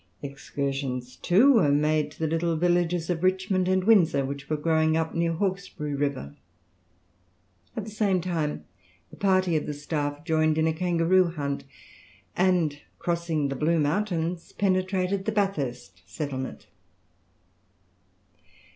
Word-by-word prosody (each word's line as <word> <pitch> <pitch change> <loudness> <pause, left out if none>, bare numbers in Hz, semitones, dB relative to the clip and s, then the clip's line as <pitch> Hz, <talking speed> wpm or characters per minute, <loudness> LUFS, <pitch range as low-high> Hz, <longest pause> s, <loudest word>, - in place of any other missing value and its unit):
Excursions 135 -2 -4
too 235 +11 +5
were 175 - +4
made 150 +1 +2
to 150 - -17
the 160 - -1
little 165 +1 0
villages 175 0 +1
of 165 -2 -2
Richmond 185 0 +1
and 185 0 +2
Windsor, 175 -10 +4
which 140 0 -6
were 155 - 0
growing 160 0 +2
up 160 0 -1
near 170 0 0
Hawkesbury 185 -4 -3
river. 140 - -2 1.4
At 220 - -2
the 215 - -8
same 200 -3 +1
time 165 -4 -2 0.5
a - - -11
party 185 -3 +2
of 155 - -1
the 150 - -3
staff 145 0 -3
joined 155 -1 +2
in 160 - +2
a 160 - +2
kangaroo 175 +2 +2
hunt, 140 -5 -4 0.7
and 175 -5 +1 0.2
crossing 170 -4 -1
the 135 - -3
Blue 160 +5 +1
Mountains 170 +1 -1
penetrated 190 0 0
the 220 - 0
Bathurst 135 - -2
settlement. 130 +6 -5
165 Hz, 135 wpm, -26 LUFS, 145-185 Hz, 1.4 s, too